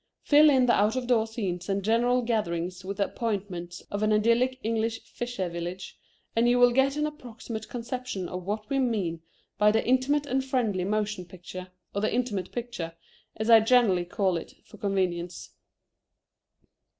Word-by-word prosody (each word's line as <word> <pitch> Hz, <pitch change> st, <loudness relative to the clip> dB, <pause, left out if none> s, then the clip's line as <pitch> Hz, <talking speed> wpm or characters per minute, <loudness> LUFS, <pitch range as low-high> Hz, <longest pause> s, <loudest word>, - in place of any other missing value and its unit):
Fill 300 Hz, +1 st, +7 dB
in 260 Hz, -3 st, +4 dB
the 240 Hz, -, +4 dB
out 210 Hz, +3 st, +3 dB
of 255 Hz, -1 st, -2 dB
door 235 Hz, -3 st, +2 dB
scenes 190 Hz, -5 st, -4 dB
and 195 Hz, 0 st, 0 dB
general 240 Hz, +4 st, +2 dB
gatherings 185 Hz, -5 st, -2 dB
with 195 Hz, +1 st, -5 dB
the 200 Hz, -, +2 dB
appointments 190 Hz, -6 st, -4 dB
of 205 Hz, -, -2 dB
an 215 Hz, 0 st, +2 dB
idyllic 235 Hz, +4 st, +2 dB
English 225 Hz, 0 st, -1 dB
fisher 240 Hz, -6 st, -4 dB
village, 175 Hz, +2 st, -6 dB, 0.4 s
and 230 Hz, +1 st, +4 dB
you 245 Hz, -, +4 dB
will 245 Hz, 0 st, +6 dB
get 270 Hz, +3 st, +2 dB
an 300 Hz, -, +1 dB
approximate 235 Hz, -6 st, -7 dB
conception 245 Hz, -5 st, -4 dB
of 180 Hz, +1 st, -6 dB
what 210 Hz, +3 st, -3 dB
we 275 Hz, -, 0 dB
mean 200 Hz, -10 st, -1 dB, 0.4 s
by 210 Hz, 0 st, +6 dB
the 220 Hz, +1 st, +1 dB
Intimate 265 Hz, +4 st, +2 dB
and 265 Hz, -1 st, 0 dB
friendly 230 Hz, -9 st, 0 dB
Motion 210 Hz, -1 st, -1 dB
Picture, 180 Hz, 0 st, -9 dB, 0.3 s
or 200 Hz, -, -1 dB
the 215 Hz, -, +1 dB
Intimate 220 Hz, -7 st, -1 dB
Picture, 235 Hz, -9 st, -5 dB, 0.4 s
as 220 Hz, -, -2 dB
I 225 Hz, -, +10 dB
generally 220 Hz, -6 st, +3 dB
call 185 Hz, 0 st, 0 dB
it, 165 Hz, -, -8 dB
for 215 Hz, -, -14 dB
convenience. 180 Hz, -3 st, -2 dB
215 Hz, 170 wpm, -27 LUFS, 185-245 Hz, 0.4 s, I